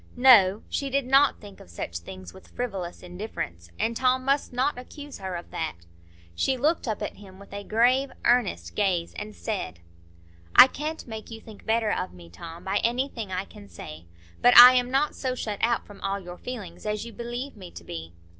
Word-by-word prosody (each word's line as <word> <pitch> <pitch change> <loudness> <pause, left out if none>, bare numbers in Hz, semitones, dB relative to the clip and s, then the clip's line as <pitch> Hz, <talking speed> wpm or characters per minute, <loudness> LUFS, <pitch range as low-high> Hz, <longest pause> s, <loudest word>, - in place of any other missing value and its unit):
No! 220 -6 +6
She 275 - -2
did 275 0 0
not 275 +2 +4
think 205 -2 -13
of - - -15
such 85 0 -5
things 90 0 -10
with - - -15
frivolous 195 -9 -5
indifference, 175 - -6
and 230 +1 -1
Tom 255 +1 +1
must 275 +1 +1
not 255 +1 0
accuse 290 +3 -10
her 190 -2 -4
of 175 - -8
that. 160 -1 -3 0.6
She 260 - 0
looked 300 +3 +1
up 215 -2 -2
at - - -5
him 190 -2 -14
with 200 0 -14
a 200 0 -5
grave, 250 +6 +2
earnest 145 - +1
gaze 180 -4 0
and 210 0 -7
said,— 185 - -4 0.8
"I - - +12
can't 305 +4 -5
make 220 -2 -8
you 225 -1 -8
think 220 -2 -14
better 220 -1 +2
of 180 - -2
me, 85 -1 -14
Tom, 165 - -10
by 195 +1 0
anything 235 -3 -1
I 185 +1 -2
can 100 - -14
say. 80 -2 -10 0.4
But 245 - +6
I 250 +1 +12
am 250 -1 +2
not 275 +3 +1
so 255 -2 -3
shut 210 -4 -4
out 235 +1 +1
from 205 - -14
all 195 0 -2
your 175 -1 -10
feelings 210 -7 -7
as 210 +1 -2
you 235 - -9
believe 240 +3 -5
me 185 -4 -10
to 85 - -11
be. 80 -1 -7
215 Hz, 200 wpm, -26 LUFS, 180-250 Hz, 0.8 s, I